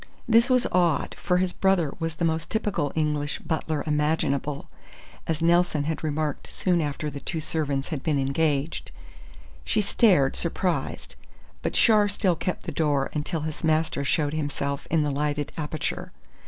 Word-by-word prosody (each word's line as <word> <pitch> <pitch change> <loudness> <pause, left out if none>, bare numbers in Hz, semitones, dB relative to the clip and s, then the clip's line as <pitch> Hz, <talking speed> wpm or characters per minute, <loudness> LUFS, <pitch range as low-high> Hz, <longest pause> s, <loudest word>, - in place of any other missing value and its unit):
This 230 +2 +5
was 255 -1 +3
odd, 175 -3 +2
for 180 -2 +1
his 180 0 0
brother 190 -6 +2
was 165 -1 -2
the 170 - -1
most 160 -1 -1
typical 210 -9 -1
British 150 -2 0
butler 155 -2 -2
imaginable, 150 -2 0 0.6
as 160 0 -1
Nelson 170 -3 +3
had 160 +1 -3
remarked 155 -1 -2
soon 180 -3 +1
after 150 0 -3
the 140 - -6
two 165 +3 -2
servants 145 -3 -1
had 155 -5 -3
been 150 0 0
engaged. 140 +2 0 0.7
She 70 - +1
stared, 190 - +3
surprised; 175 +1 -2 0.5
but - - -2
Char 215 -3 +5
still 195 -3 +1
kept 180 +3 -3
the - - -4
door 145 -4 +1
until 155 +2 -2
his 155 +1 -5
master 155 -2 +1
showed 145 +1 +1
himself 145 -2 -3
in 160 -1 +2
the 145 - 0
lighted 145 0 -1
aperture. 155 -1 -3
155 Hz, 155 wpm, -26 LUFS, 145-170 Hz, 0.7 s, This